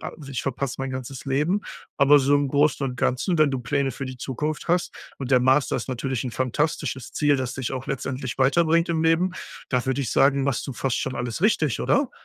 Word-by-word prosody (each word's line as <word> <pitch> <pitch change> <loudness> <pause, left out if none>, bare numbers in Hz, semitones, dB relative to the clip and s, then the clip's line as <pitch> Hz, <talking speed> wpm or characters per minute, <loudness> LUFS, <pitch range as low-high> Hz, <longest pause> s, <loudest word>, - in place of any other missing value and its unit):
„Also, 145 -4 -8
ich 125 -4 -3
verpasse 135 -1 -2
mein 135 0 -3
ganzes 130 0 -6
Leben“, 150 +9 +1 0.4
aber 145 +1 +6
so 140 +1 +3
im 145 -1 +2
Großen 145 0 +2
und 125 -1 -5
Ganzen, 130 +9 0
wenn 155 -1 +5
du 135 -2 -2
Pläne 135 +1 -1
für 135 +2 -5
die 130 - -7
Zukunft 150 +5 -4
hast 175 +1 +1 0.3
und 135 -2 -5
der 130 - +6
Master 135 +2 +3
ist 125 - -5
natürlich 130 0 -2
'n 125 - -3
fantastisches 130 0 -2
Ziel, 145 -1 +2
das 130 -2 -3
dich 130 -3 -3
auch 130 -1 -5
letztendlich 130 -2 -4
weiterbringt 165 +5 +3
im 165 -1 0
Leben, 165 +3 +3 0.4
da 125 -1 0
würde 130 +1 0
ich 130 - -2
sagen, 140 0 +3
machst 135 -2 -1
du 135 - -4
fast 130 +1 -1
schon 130 - -3
alles 120 +7 -4
richtig, 155 - +2
oder? 280 -2 +2
135 Hz, 220 wpm, -24 LUFS, 130-150 Hz, 0.4 s, aber